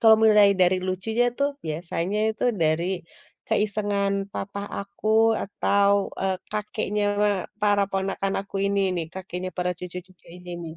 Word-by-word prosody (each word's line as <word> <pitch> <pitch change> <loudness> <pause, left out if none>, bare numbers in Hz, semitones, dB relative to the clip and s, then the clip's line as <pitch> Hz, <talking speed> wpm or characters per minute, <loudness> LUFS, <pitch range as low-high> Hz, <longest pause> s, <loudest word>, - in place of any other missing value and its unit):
Kalau 220 -1 +7
mulai 210 -2 +7
dari 180 +1 +5
lucunya 220 +6 0
tuh 280 0 +3 0.2
biasanya 170 +5 -2
itu 220 - -2 0.2
dari 155 +2 +2 0.6
keisengan 205 -1 +1 0.2
papa 200 +1 -5 0.2
aku 200 +2 -5 0.3
atau, 200 0 +2 0.3
eee, 190 -1 0 0.2
kakeknya 210 0 -2 0.6
para 205 -1 +3
ponakan 195 0 -1
aku 195 0 -8
ini 200 0 +1 0.2
nih, 165 -2 -2
kakeknya 185 -1 -5
para 180 0 0
cucu-cucu 180 0 -9
ini 180 0 -11
nih. 160 0 -8
195 Hz, 135 wpm, -25 LUFS, 180-205 Hz, 0.6 s, Kalau